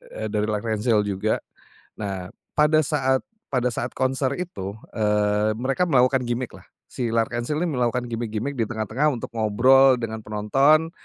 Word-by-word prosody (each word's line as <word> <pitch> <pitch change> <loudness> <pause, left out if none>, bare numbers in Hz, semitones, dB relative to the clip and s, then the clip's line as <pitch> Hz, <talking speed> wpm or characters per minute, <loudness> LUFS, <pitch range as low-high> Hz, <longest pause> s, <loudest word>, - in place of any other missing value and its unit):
eee, 110 - -3
dari 105 0 0
L'Arc-en-Ciel 110 +1 +1
juga. 105 +1 -1 0.6
Nah 95 -2 -4 0.2
pada 150 +1 +4
saat 135 -3 +1 0.3
pada 125 -2 +1
saat 120 +2 -3
konser 130 +1 0
itu, 100 - -5 0.2
eee, 105 0 +2
mereka 135 +8 0
melakukan 130 -5 +3
gimik 120 +1 -3
lah, - - -14 0.2
si 120 -3 -3
L'Arc-en-Ciel 120 +5 -1
nih 170 -1 0
melakukan 125 0 0
gimik-gimik 115 +3 -3
di 115 - 0
tengah-tengah 115 +6 0
untuk 120 -5 -6
ngobrol 125 +4 +5
dengan 110 -1 -5
penonton, 135 +10 +2
120 Hz, 145 wpm, -24 LUFS, 110-135 Hz, 0.6 s, ngobrol